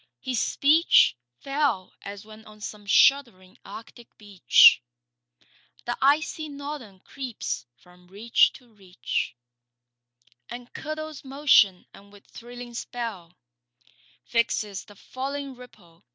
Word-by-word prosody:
His 255 -4 -2
speech 310 - +4 0.3
Fell 275 -9 -1
as 200 +1 -9
when 215 0 -14
on 215 0 -15
some 210 -1 -9
shuddering 225 -5 +2
arctic 235 +1 -13
beach 205 -4 +5 1.0
The 240 - -2
icy 305 +2 +1
Northern 280 -9 -8
creeps 255 - -6
from 180 +6 -22
reach 210 +5 +2
to 245 -4 -18
reach 185 - -4 1.1
And 240 0 -10
curdles 310 0 -7
motion 265 -9 +3
and 200 0 -17
with 205 -1 -18
thrilling 240 0 -11
spell 230 -8 -7 0.9
Fixes 215 -4 -1
the 205 - -16
falling 275 +5 -6
ripple. 190 -9 -17
235 Hz, 110 wpm, -25 LUFS, 200-275 Hz, 1.1 s, beach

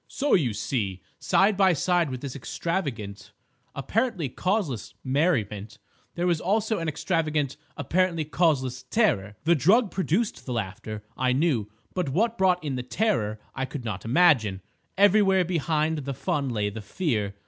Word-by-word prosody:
"So, 285 +1 -1
you 135 - +3
see, 100 -5 -2 0.2
side 200 +2 +3
by 190 -2 +4
side 175 +1 +1
with 130 -1 -5
this 140 -2 -6
extravagant, 130 - -4 0.4
apparently 195 - -1
causeless 145 - -2
merriment, 130 - 0 0.4
there 175 - -1
was 170 -3 +1
also 215 +3 +1
an 165 - -3
extravagant, 155 -3 -1 0.2
apparently 175 -3 0
causeless 140 -5 +1
terror. 125 - +1
The 165 +2 +4
drug 190 - +3
produced 195 +2 -1
the 125 - -2
laughter, 105 0 -5
I 130 0 +1
knew; 130 -7 +1 0.2
but 180 -6 -1
what 220 - +1
brought 185 -4 +2
in 140 -4 -2
the - - -2
terror 125 - -1
I 135 - -2
could 130 -1 -7
not 100 -4 -4
imagine. 115 - +3 0.3
Everywhere 195 -2 +5
behind 160 -2 0
the 140 -1 -4
fun 140 +1 -1
lay 105 -3 -1
the 110 +2 -7
fear. 105 - -2
150 Hz, 150 wpm, -26 LUFS, 120-180 Hz, 0.4 s, Everywhere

